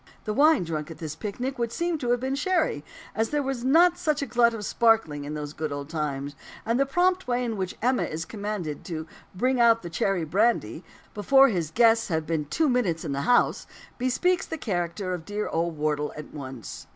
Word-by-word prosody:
The 215 - -2
wine 300 - +4
drunk 160 -2 -4
at 165 - -9
this 155 -2 -6
picnic 245 +7 -4
would 235 -1 -1
seem 340 +3 -1
to 245 -4 -3
have 245 0 +2
been 260 +2 -2
sherry; 310 - 0 0.3
as 225 0 0
there 295 -1 0
was 265 -3 -3
not 340 +6 +4
such 305 -4 0
a - - -1
glut 235 -1 +3
of 225 -2 -6
"the - - -6
sparkling" 220 -11 +2
in 150 +1 -5
those 150 -1 -5
good 155 -1 -4
old 145 0 -5
times. 145 -3 -3 0.3
And 230 +3 +1
the 275 - +2
prompt 365 +5 +1
way 245 0 0
in 230 -2 -2
which 190 -2 -4
"Emma" 250 +1 +2
is 165 +1 -3
commanded 200 -8 -5
to 160 -3 -5 0.3
"bring 255 +6 +1
out 230 -2 +5
the 175 - -7
cherry 180 0 0
brandy," 185 - +1 0.3
before 270 +6 +5
his 175 -8 -1
guests 230 +4 +4
have 160 -3 -1
been 155 -1 -1
two 310 - +1
minutes 210 - 0
in 150 - -3
the 140 0 -1
house, 245 - +3 0.3
bespeaks 340 +9 +1
the 320 - -4
character 185 - -2
of 175 -3 -5
dear 205 +4 -3
old 165 0 -1
Wardle 150 -1 0
in 150 - -9
once. 125 - -8
210 Hz, 215 wpm, -26 LUFS, 155-255 Hz, 0.3 s, out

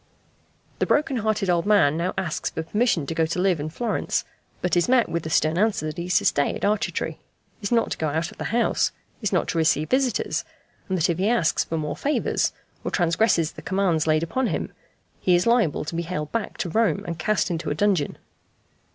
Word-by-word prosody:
The - - +1
broken 285 -3 +2
hearted 215 -2 0
old 175 +1 +1
man 195 -9 +4
now 170 +3 -1
asks 180 -5 -2
for 160 - -4
permission 205 - +1
to 165 - -3
go 160 0 +1
to 170 - -3
live 185 -3 +2
in 150 +2 -3
Florence, 225 +7 -1 0.3
but 180 - 0
is 175 +6 +2
met 255 -2 +4
with 170 - -2
the 160 - -6
stern 155 +2 +2
answer 215 -6 +1
that 155 +2 -4
he 170 - -4
is 180 - +3
to - - 0
stay 145 - +2
at - - -7
Arcetri, 210 0 -1 0.4
is 200 - -3
not 230 -1 +2
to - - -3
go 160 - 0
out 160 +3 -1
of - - -17
the - - -3
house, 235 +2 +1 0.3
is 210 - -1
not - - +1
to 165 - 0
receive 155 -1 +2
visitors, 260 -1 +1 0.5
and 190 - +1
that 160 - +2
if 170 0 -1
he 195 +3 +2
asks 230 -9 +2
for 165 - -3
more 150 -1 -3
favours, 295 +2 0 0.3
or - - -2
transgresses 170 -1 +2
the - - -11
commands 185 -5 +1
laid 155 +1 +3
upon 255 +9 0
him, - - -2 0.5
he 180 - +3
is 175 - +2
liable 235 -12 +2
to 155 - -5
be 170 - 0
haled 160 -3 -4
back 230 -2 -3
to 175 - -2
Rome 220 -6 +2
and 170 -2 -5
cast 205 +1 +1
into 165 -1 -2
a 145 - -1
dungeon. 190 -5 +1
175 Hz, 225 wpm, -24 LUFS, 160-215 Hz, 0.5 s, man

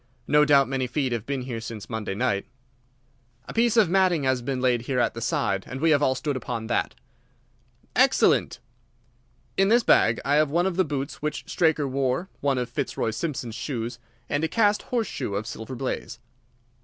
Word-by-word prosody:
No 150 0 +5
doubt 140 -2 +5
many 130 -1 -1
feet 135 0 -1
have 115 -2 -3
been 135 -2 -2
here 120 -3 -5
since 115 -2 -7
Monday 110 -4 -4
night." 100 -1 0 1.0
"A - - -7
piece 235 0 +2
of 215 -4 +6
matting 180 -3 +2
has 130 -1 +1
been 130 +1 -2
laid 125 -2 +2
here 130 +2 -3
at 120 - +1
the 115 - -7
side, 95 -3 0
and 130 - -6
we 160 +2 +3
have 145 -1 +4
all 130 -2 +2
stood 145 -2 -2
upon 120 -3 -4
that." 120 +1 -1 1.0
"Excellent." 260 +2 +3 1.0
"In 195 - +4
this 235 +3 +4
bag 115 - +4
I 145 +1 +3
have 155 -1 +3
one 170 +4 +1
of 190 -2 -1
the 185 - +3
boots 140 -4 -4
which 150 0 -3
Straker 155 -4 +1
wore, 135 +6 -1
one 140 -2 +1
of 125 -1 -1
Fitzroy 120 -2 -2
Simpson's 120 -1 -4
shoes, 120 -1 -4 0.3
and 145 +2 -1
a - - +2
cast 210 +1 +2
horseshoe 225 - -2
of 105 +2 -2
Silver 115 +2 -7
Blaze." 120 -2 -4
135 Hz, 190 wpm, -25 LUFS, 120-160 Hz, 1.0 s, of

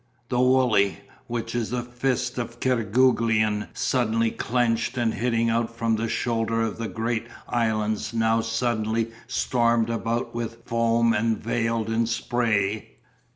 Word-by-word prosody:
The 125 - 0
Wooley, 125 -6 +3 0.3
which 115 -1 -3
is 120 -2 -1
the 125 0 -2
fist 125 +1 -2
of 120 0 -5
Kerguelen 115 -3 +2
suddenly 115 -3 +1
clenched 120 0 0
and 115 -2 +1
hitting 115 -1 +1
out 115 0 +1
from 115 -1 +1
the 115 +1 -2
shoulder 115 -1 0
of 115 0 -3
the 115 - -2
great 115 +3 -2 0.2
islands 110 -2 0
now 115 0 +2
suddenly 115 -1 -1 0.2
stormed 115 -3 +1
about 115 +1 -2
with 115 0 -5
foam 115 -1 +2
and 115 +1 +1
veiled 115 0 -1
in 115 0 +1
spray. 115 -3 -1
115 Hz, 135 wpm, -25 LUFS, 110-120 Hz, 0.3 s, Wooley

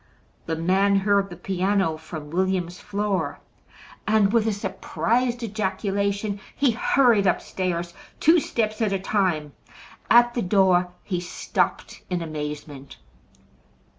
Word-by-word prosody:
The 160 - -1
man 190 +5 +2
heard 195 0 +2
the 175 - -8
piano 190 -1 0
from 155 -1 -9
William's 180 0 -1
floor, 200 -7 -2 0.7
and 215 -1 +3
with 225 -2 +3
a - - +2
surprised 240 +4 -1
ejaculation 200 -1 -2 0.2
he 280 -3 +3
hurried 230 -3 +3
upstairs 175 -1 -1 0.3
two 330 +3 +5
steps 215 -6 -2
at 215 -3 +1
a - - +1
time. 185 -7 -1 0.6
At 240 +1 +6
the 240 - -1
door 185 -2 +3
he 180 -4 -2
stopped 175 - -2
in 180 -2 -1
amazement. 150 -3 -7
195 Hz, 120 wpm, -24 LUFS, 175-215 Hz, 0.7 s, At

